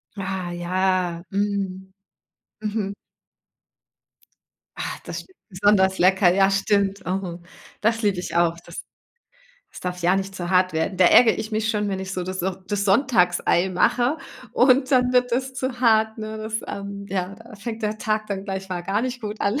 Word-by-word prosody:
Ah, 190 -2 -4
ja. 180 -1 0
Mm. 195 -2 -2 0.7
Mhm. 210 -2 -2 1.8
Ah. - - -4 0.2
Das - - -5
sch - - -18 0.2
besonders 190 0 +3
lecker. 185 0 +5
Ja, 195 +1 +4
stimmt. 195 0 +1
Oh, 180 -1 -3 0.4
das 225 +2 +1
lieb 200 -4 +1
ich 180 - -5
auch. 170 -1 +3
Das 170 - -8 0.9
das - - -10
darf 180 -1 -5
ja 180 +2 +3
nicht 195 0 -3
zu 175 -2 -4
hart 185 0 +3
werden. 160 +4 -1
Da 185 - +5
ärgere 225 +5 +6
ich 220 0 -5
mich 220 +1 0
schon, 210 -2 -1
wenn 190 -1 -2
ich 190 0 -5
so 180 -1 -3
das 185 -1 -4
auch 190 0 -1
das 200 0 -1
Sonntagsei 190 -5 +3
mache 245 - +2 0.4
und 260 +2 +4
dann 250 -1 +3
wird 250 0 +3
das 260 +2 -1
zu 255 -1 -3
hart, 220 -2 +3
ne? 215 0 -5
Das, 215 0 -5
ähm 200 0 -6
ja, 185 0 -3
da 225 +1 -13
fängt 220 +3 -6
der 215 0 -1
Tag 215 -1 -1
dann 195 -1 -4
gleich 195 -1 -5
mal 180 -2 -3
gar 195 +4 0
nicht 250 0 -3
gut 210 -1 -6
an. 210 +8 +1
200 Hz, 180 wpm, -23 LUFS, 185-220 Hz, 1.8 s, ärgere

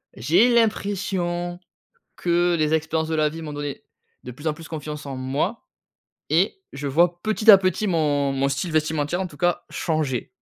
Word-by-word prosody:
j'ai 185 - +3
l'impression 185 -5 0 0.6
que 175 0 +2
les 155 0 +2
expériences 160 0 -1
de 160 - -1
la 155 -1 +2
vie 165 +2 -8
m'ont 150 -2 -6
donné, 145 -1 -5 0.4
de 125 - -7
plus 145 +6 -11
en 155 - +2
plus, 165 +1 -11
confiance 150 -2 -6
en 135 -2 -5
moi 140 - -2 0.6
et 385 - +1
je 140 +1 -5
vois, 175 +4 +2
petit 215 0 +5
à 200 - +11
petit, 190 +2 0
mon 145 -5 +1
mon 135 0 0
style 155 +6 -2
vestimentaire, 155 +2 0
en - - -3
tout 145 -5 -13
cas, 175 +1 +1
changer. 155 -7 -2
160 Hz, 180 wpm, -23 LUFS, 145-175 Hz, 0.6 s, à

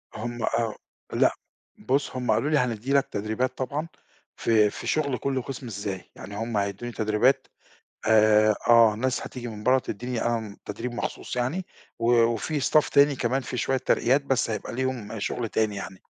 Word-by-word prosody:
هُم 120 +1 -4
آه، 115 -2 0 0.4
لأ - - +3 0.5
بُصّ، 135 0 0
هُم 125 -1 0
قالوا 150 - +1
لي 150 - +3
هندّي 125 +2 -1
لك 140 - +3
تدريبات 110 +5 -2
طبعًا 145 +5 -3 0.5
في 110 -2 +3
في - - -7
شُغل 140 -5 +1
كلّ 135 -2 -1
قِسم، 130 0 -7
إزاي، 100 -3 -5
يعني 100 +2 -9
هُم 115 0 -2
هيدّوني 100 +4 -2 1.2
آآ، 110 -1 +5
آه 115 -2 +7
ناس 125 +4 -1
هتيجي 120 -2 -6
من 105 -1 -8
برّه 130 +1 +5
تدّيني 125 0 -4
آآ، 110 -3 -2
تدريب 115 +4 -5
مخصوص 120 - -4
يعني، 140 +10 -1 0.3
وفي 120 +5 +2
staff 155 +2 +3
تاني، 140 -1 +5
كمان 130 +3 0
في 125 - -5
شوية 130 +3 +1
ترقيات 130 +1 +2
بس 130 -4 +1
هيبقى 105 -2 -4
ليهم 125 -4 -3
شُغل 115 +2 -2
تاني 105 -2 0
يعني، 95 -1 -7
120 Hz, 165 wpm, -26 LUFS, 110-130 Hz, 1.2 s, آه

